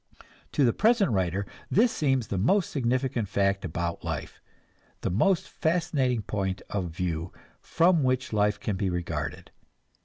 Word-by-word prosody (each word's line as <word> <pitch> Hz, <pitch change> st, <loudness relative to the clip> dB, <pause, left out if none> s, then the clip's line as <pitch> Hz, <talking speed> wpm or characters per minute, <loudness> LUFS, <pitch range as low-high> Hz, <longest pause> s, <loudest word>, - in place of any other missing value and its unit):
To 140 Hz, -, +3 dB
the 120 Hz, -, +3 dB
present 215 Hz, -, +3 dB
writer 95 Hz, 0 st, 0 dB, 0.2 s
this 230 Hz, +3 st, +4 dB
seems 135 Hz, -7 st, 0 dB
the 95 Hz, -, -1 dB
most 185 Hz, -, +2 dB
significant 125 Hz, -3 st, 0 dB
fact 100 Hz, 0 st, +1 dB
about 85 Hz, -1 st, -3 dB
life, -, -, -5 dB, 0.6 s
the -, -, -1 dB
most 170 Hz, -, +2 dB
fascinating 155 Hz, -9 st, 0 dB
point 95 Hz, -2 st, -2 dB
of 100 Hz, -3 st, -1 dB
view 85 Hz, 0 st, -3 dB, 0.3 s
from 170 Hz, 0 st, +3 dB
which 130 Hz, -1 st, 0 dB
life 105 Hz, 0 st, +2 dB
can 100 Hz, -3 st, -2 dB
be 95 Hz, 0 st, 0 dB
regarded. 75 Hz, -4 st, -4 dB
105 Hz, 145 wpm, -27 LUFS, 95-140 Hz, 0.6 s, this